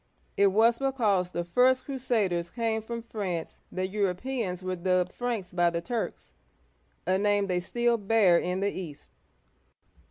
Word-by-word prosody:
It 200 - +5
was 225 +4 +4
because 215 -10 +1
the 175 - -2
first 250 +8 +3
crusaders 220 -11 0
came 225 -2 -1
from 230 +1 -6
France 195 -7 -4
that 185 0 -2
Europeans 200 0 -2
were 185 0 -2
dubbed 180 0 0
Franks 235 -7 -3
by 175 -1 +3
the 170 0 -2
Turks, 230 +7 -4 0.7
a 185 +1 +2
name 205 0 +2
they 180 -2 0
still 235 +6 +1
bear 200 -4 +4
in 180 +1 -2
the 200 0 +1
East. 165 -6 -8
200 Hz, 150 wpm, -28 LUFS, 180-235 Hz, 0.7 s, It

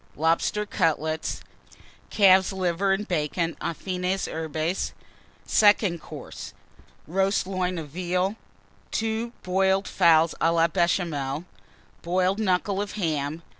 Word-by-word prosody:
Lobster 165 +7 +1
Cutlets. 160 -5 -1 0.7
Calf's 190 -2 +5
Liver 190 +1 0
and 205 +2 -2
Bacon, 165 0 -1
aux 170 - -2
fines 185 +1 -2
herbes. 160 +2 -2 0.5
SECOND 205 -5 +4
COURSE. - - -9 0.5
Roast 195 +4 +1
Loin 185 -1 -2
of 155 -3 -6
Veal. 180 +5 -1 0.5
Two 225 +1 -2
Boiled 190 +1 +1
Fowls 165 -2 +4
à 165 - +4
la 165 0 +3
Béchamel. 165 -4 -1 0.6
Boiled 185 +3 +1
Knuckle 195 -1 +1
of 205 - -5
Ham. 160 -4 -2
180 Hz, 110 wpm, -25 LUFS, 165-195 Hz, 0.7 s, Calf's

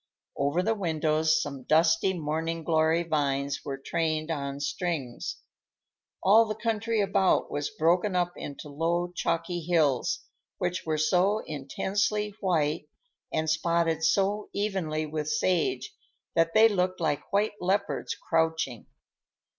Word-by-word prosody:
Over 145 +6 +1
the 225 - +2
windows 160 -4 +1
some 140 -3 -4
dusty 165 +6 +3
morning 160 +1 -2
glory 160 +1 +2
vines 140 -3 -1
were 135 -1 -4
trained 155 +2 -1
on 140 -2 -3
strings. 145 -5 -3 0.9
All 220 +4 +6
the 215 -1 -3
country 225 0 0
about 195 -1 +2
was 145 0 -2
broken 175 +4 +1
up 175 0 +1
into 145 +1 -7
low 170 +4 -1
chalky 170 +1 -1
hills, 155 -6 +1 0.4
which 180 -2 -2
were 155 -1 +1
so 185 +7 +2
intensely 205 +8 -1
white, 160 -6 0 0.4
and 160 0 -1
spotted 165 0 +1
so 200 +5 +1
evenly 190 -7 -1
with 155 0 -3
sage, 185 - 0 0.4
that 165 0 +2
they 220 +1 +8
looked 185 -3 0
like 150 -4 -1
white 205 +2 +2
leopards 200 +3 -1
crouching. 160 -7 -1
165 Hz, 125 wpm, -28 LUFS, 155-190 Hz, 0.9 s, they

